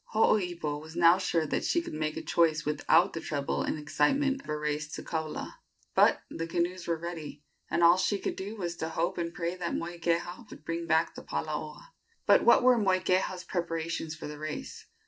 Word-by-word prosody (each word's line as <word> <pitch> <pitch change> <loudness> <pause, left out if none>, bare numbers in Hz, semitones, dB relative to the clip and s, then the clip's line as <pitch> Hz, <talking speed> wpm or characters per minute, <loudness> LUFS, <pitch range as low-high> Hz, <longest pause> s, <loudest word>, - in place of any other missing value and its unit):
Hooipo 175 -9 +1
was 160 +1 -11
now 175 +1 +6
sure 170 -4 +1
that - - -1
she 340 - +2
could 340 - -6
make 155 0 -2
a - - -4
choice 160 -2 +2
without 150 +3 +3
the 165 - -4
trouble 145 -3 -2
and - - -1
excitement 265 - +1
of - - -15
a 150 - -1
race 150 0 -2
to - - -5
Kaula; 160 -2 -4 0.3
but - - +4
the 165 - -4
canoes 175 +1 -2
were 170 -1 0
ready, 160 -3 -7 0.3
and 170 - +1
all 170 +1 +7
she 200 +2 +1
could - - -3
do 200 +3 -6
was 175 -5 -4
to 160 -1 -3
hope 170 +3 -1
and 170 -1 -2
pray 170 0 -3
that 180 -2 -3
Moikeha 175 +4 -2
would 155 - -12
bring 165 0 -3
back 160 +1 +2
the - - -9
palaoa. - - -5 0.4
But - - +5
what - - +6
were 250 -1 +6
Moikeha's 185 -2 +1
preparations 165 -2 -3
for 160 - -8
the 150 0 -7
race? 155 0 -6
170 Hz, 200 wpm, -29 LUFS, 155-180 Hz, 0.4 s, all